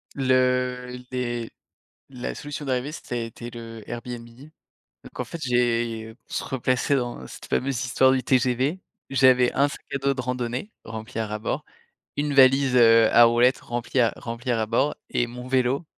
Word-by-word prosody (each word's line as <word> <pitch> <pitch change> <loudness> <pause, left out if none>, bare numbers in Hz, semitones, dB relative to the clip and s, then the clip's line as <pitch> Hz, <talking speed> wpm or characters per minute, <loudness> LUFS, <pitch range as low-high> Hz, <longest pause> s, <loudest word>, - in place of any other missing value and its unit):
Le 125 -1 +1
les 120 -2 -3 0.6
la 125 -2 -5
solution 145 0 -6
d'arrivée, 130 +1 -1
ça 140 - -7
a - - 0
été 115 +1 -6
le 115 -1 -9
Airbnb. 120 0 -6 0.8
Donc - - -13
en - - 0
fait, 170 - -8
j'ai 115 -3 0
pour - - -11
se - - -1
replacer 130 +1 0
dans 120 - -3
cette - - -11
fameuse 135 -1 -1
histoire 130 +1 +4
du 130 -1 +1
TGV, 130 +6 +1 0.3
j'avais 130 -2 +5
un 140 - +3
sac 145 - -8
à - - +1
dos 140 0 +1
de 130 - -4
randonnée 125 - -3
rempli 110 0 -6
à 110 - -1
ras 105 0 -4
bord, - - -3 0.5
une 145 0 0
valise, 135 -1 +5
heu, 115 -1 +6
à 120 - +8
roulettes 120 +2 +4
remplie 120 +2 -3
à 115 -2 +3
remplie 120 +2 -4
à 120 - +1
ras 110 - 0
bord 120 +7 +1
et 120 - 0
mon 125 +1 -8
vélo 130 +4 +1
125 Hz, 180 wpm, -24 LUFS, 120-130 Hz, 0.8 s, à